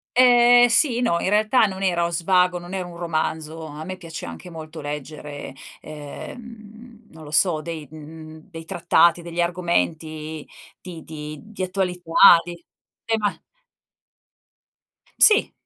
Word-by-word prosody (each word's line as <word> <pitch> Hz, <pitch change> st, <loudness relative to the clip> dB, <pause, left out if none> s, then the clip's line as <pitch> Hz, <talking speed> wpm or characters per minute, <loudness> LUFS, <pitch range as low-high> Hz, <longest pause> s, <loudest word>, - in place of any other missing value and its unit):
Ehm, 245 Hz, -1 st, +6 dB
sì, 240 Hz, 0 st, +3 dB
no, 170 Hz, -9 st, +1 dB
in 190 Hz, -, -1 dB
realtà 215 Hz, +3 st, +3 dB
non 190 Hz, 0 st, -6 dB
era 175 Hz, -2 st, +1 dB
uno -, -, -1 dB
svago, 180 Hz, +1 st, +1 dB
non 175 Hz, +2 st, -9 dB
è 190 Hz, -, -2 dB
un 175 Hz, -1 st, -9 dB
romanzo. 160 Hz, -1 st, -3 dB
A 150 Hz, +1 st, -8 dB
me 185 Hz, +2 st, -7 dB
piace 165 Hz, -4 st, -8 dB
anche 85 Hz, -, -9 dB
molto 160 Hz, -1 st, -9 dB
leggere, 145 Hz, -1 st, -7 dB, 0.3 s
ehm, 220 Hz, -, -11 dB
non 160 Hz, -1 st, -13 dB
lo 150 Hz, -, -11 dB
so, 160 Hz, -1 st, +2 dB
dei 160 Hz, -3 st, -7 dB
mhmm, 155 Hz, +2 st, -12 dB
dei 165 Hz, -2 st, -10 dB
trattati, 170 Hz, -1 st, +2 dB
degli 170 Hz, 0 st, -4 dB
argomenti 160 Hz, -3 st, -2 dB, 0.3 s
di 170 Hz, -4 st, -10 dB
di 150 Hz, -1 st, -8 dB
di 215 Hz, -3 st, -7 dB
attualità, 180 Hz, -2 st, +4 dB
di 175 Hz, -1 st, -10 dB, 0.4 s
tema 220 Hz, -3 st, -1 dB, 1.8 s
Sì, 430 Hz, 0 st, +5 dB
170 Hz, 140 wpm, -22 LUFS, 155-195 Hz, 1.8 s, Ehm